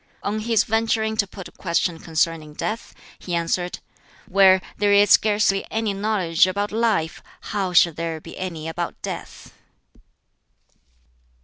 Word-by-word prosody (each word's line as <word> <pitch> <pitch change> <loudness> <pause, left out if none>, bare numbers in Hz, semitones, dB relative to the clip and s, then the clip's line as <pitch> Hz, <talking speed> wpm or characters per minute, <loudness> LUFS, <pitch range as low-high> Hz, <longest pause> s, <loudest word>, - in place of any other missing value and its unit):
On 210 +2 -1
his 225 0 +2
venturing 220 0 0
to 205 - +2
put 190 -1 -9
a - - -16
question 170 -1 -1
concerning 160 -2 -1
death, 220 +7 -4 0.2
he 175 - -4
answered, 175 +1 -1 0.5
"Where 190 0 +6 0.2
there 205 0 +3
is 205 0 +5
scarcely 205 -2 +4
any 220 -2 -1
knowledge 195 -5 +2
about 200 +2 -2
life, 215 -8 0 0.3
how 195 -3 -1
shall 170 -1 +5
there 165 0 -4
be - - -11
any 165 -4 -5
about 170 +1 -4
death?" - - -7
190 Hz, 135 wpm, -22 LUFS, 170-215 Hz, 0.5 s, Where